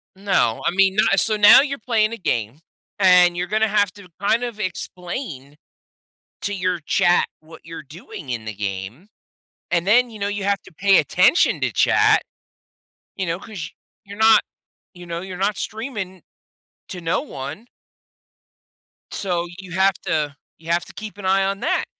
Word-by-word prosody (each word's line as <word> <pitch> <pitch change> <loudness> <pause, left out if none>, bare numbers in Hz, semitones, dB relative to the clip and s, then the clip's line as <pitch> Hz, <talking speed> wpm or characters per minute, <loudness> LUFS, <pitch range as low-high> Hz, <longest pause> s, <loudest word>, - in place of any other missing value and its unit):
No, 190 - +1
I - - +2
mean, 190 +1 +3
not 195 -2 +3
so 220 - +2
now 210 +2 +8
you're 275 -1 -3
playing 220 -2 0
a - - -5
game, 120 - -2 0.4
and 180 -2 +6
you're 180 +1 -2
gonna 220 +1 +1
have 205 -2 +2
to 200 -3 -14
kind 225 +4 +2
of 235 -3 -5
explain 175 - -6 0.9
to 205 - -2
your 185 -2 -1
chat 175 +3 +2
what 160 +1 -15
you're 165 0 -8
doing 150 -1 -10
in 115 -3 -4
the 110 -1 -6
game, 100 - -5 0.6
and 175 +1 0
then, 245 +4 +4
you 220 - -11
know, 200 0 -2
you 205 -1 -4
have 200 0 0
to - - -17
pay 195 +4 +3
attention 180 - +3
to - - 0
chat, - - +4 0.9
you 190 - -2
know, 170 +1 -2
'cause 195 -6 -8 0.3
you're 200 +1 -11
not 220 0 +6 0.5
you 175 -1 -12
know, 170 0 -4
you're 185 0 -7
not 200 +1 0
streaming 215 -2 -5 0.7
to 180 - -7
no 165 -1 0
one 145 - -8 1.5
so, 175 -3 -2
you 190 -1 -11
have 190 +1 +3
to 150 -2 -1 0.2
you 165 +1 -6
have 170 0 +1
to - - -14
keep 210 -3 -8
an 205 - -8
eye 195 +1 +3
on 195 +1 -1
that. 370 - 0
190 Hz, 170 wpm, -21 LUFS, 170-205 Hz, 1.5 s, now